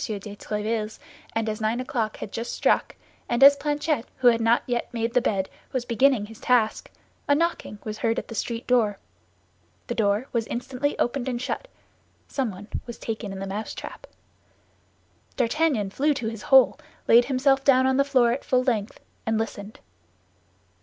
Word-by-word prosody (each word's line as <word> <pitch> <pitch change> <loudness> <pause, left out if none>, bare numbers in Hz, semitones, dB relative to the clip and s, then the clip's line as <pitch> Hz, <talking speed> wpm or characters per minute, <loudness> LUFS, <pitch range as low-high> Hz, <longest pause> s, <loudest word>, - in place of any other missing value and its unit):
de 205 -1 -5
Tréville's, 215 +1 -3 0.4
as 220 -1 -1
nine 220 +3 0
o'clock 235 -4 -2
had 200 - -7
just 230 +1 -4
struck, - - +1 0.3
and 240 +2 +3
as 280 +1 +10
Planchet, 290 -2 -1
who 250 -2 +6
had 230 -1 +2
not 230 +1 +3
yet 240 -1 -2
made 230 0 -2
the 250 - +4
bed, 195 -4 0 0.2
was 255 -2 -2
beginning 245 -1 +3
his 220 +1 -13
task, 235 -3 +1 0.4
a 285 - +4
knocking 335 -8 -1
was 215 0 -5
heard 230 0 +1
at - - -3
the - - -8
street 230 +1 -3
door. 225 -5 +2 0.9
The - - -3
door 210 +2 +1
was 230 -2 0
instantly 260 +3 -2
opened 260 +1 -1
and 245 -2 -2
shut; 280 - -4 0.6
someone 210 -7 -3 0.2
was 235 - -7
taken 220 -2 -5
in 195 - -6
the 195 - -4
mousetrap. 205 +3 -6 1.3
D'Artagnan 250 -5 +1
flew 290 +6 +1
to 235 - -3
his 225 -2 -7
hole, 265 +2 +6 0.3
laid 240 +1 +7
himself 270 0 +2
down 260 -2 +5
on 265 0 +2
the 275 - +5
floor 255 -4 +3
at 255 - -2
full 255 -1 +2
length, 225 -5 -1 0.3
and 225 0 +1
listened. 215 -1 -5
235 Hz, 170 wpm, -25 LUFS, 215-260 Hz, 1.3 s, as